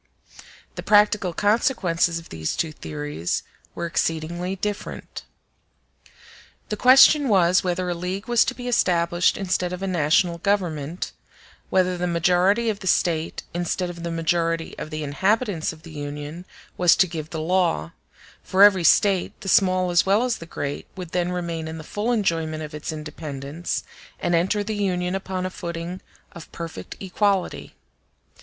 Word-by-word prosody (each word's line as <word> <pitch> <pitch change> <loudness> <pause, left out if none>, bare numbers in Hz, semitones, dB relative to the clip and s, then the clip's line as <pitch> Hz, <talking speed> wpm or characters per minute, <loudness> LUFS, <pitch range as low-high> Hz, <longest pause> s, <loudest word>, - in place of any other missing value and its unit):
The - - -6
practical 210 -3 +3
consequences 195 -5 +1
of 165 - -10
these 80 -1 -3
two 160 - -1
theories 150 - -4 0.3
were 170 - -3
exceedingly 170 +3 -2
different. 205 +2 -5 1.5
The 210 - -1
question 265 +4 +6
was, 185 -3 +4
whether 180 0 -1
a 175 - 0
league 180 +5 -4
was 240 -1 +4
to - - -2
be 245 -1 -7
established 175 -6 +2
instead 180 -2 -1
of 180 +1 -5
a - - -1
national 170 0 +2
Government; 175 -5 -1 0.6
whether 185 -1 +1
the 180 - 0
majority 180 +6 +2
of 210 -2 -1
the 190 - -7
State, 165 -3 +1
instead 175 +1 -2
of 170 -1 -10
the 170 - -3
majority 165 0 0
of - - -5
the 155 -1 -4
inhabitants 190 - 0
of 160 0 -14
the 165 - -11
Union, 145 +3 -6 0.3
was 175 -1 +5
to - - +4
give 160 -3 -6
the 160 - -5
law: 165 - +1 0.5
for 190 +1 +4
every 195 -3 +6
State, 190 +2 +3
the 195 - -8
small 185 -1 +3
as 175 - +4
well 200 +4 +3
as 250 -2 -1
the 165 - -9
great, 145 -3 -5
would 180 -3 -7
then 180 -1 0
remain 170 -3 -3
in 160 0 -6
the 160 - -8
full 210 +8 -2
enjoyment 165 -8 0
of 150 0 -8
its 150 +1 -5
independence, 150 0 -5 0.4
and 175 - -1
enter 190 +5 +2
the 215 +1 -3
Union 180 -3 -1
upon 190 -1 -3
a 185 - -3
footing 170 +1 -6 0.3
of 165 -4 -12
perfect 165 - -7
equality. 195 0 -1
175 Hz, 160 wpm, -23 LUFS, 165-195 Hz, 1.5 s, question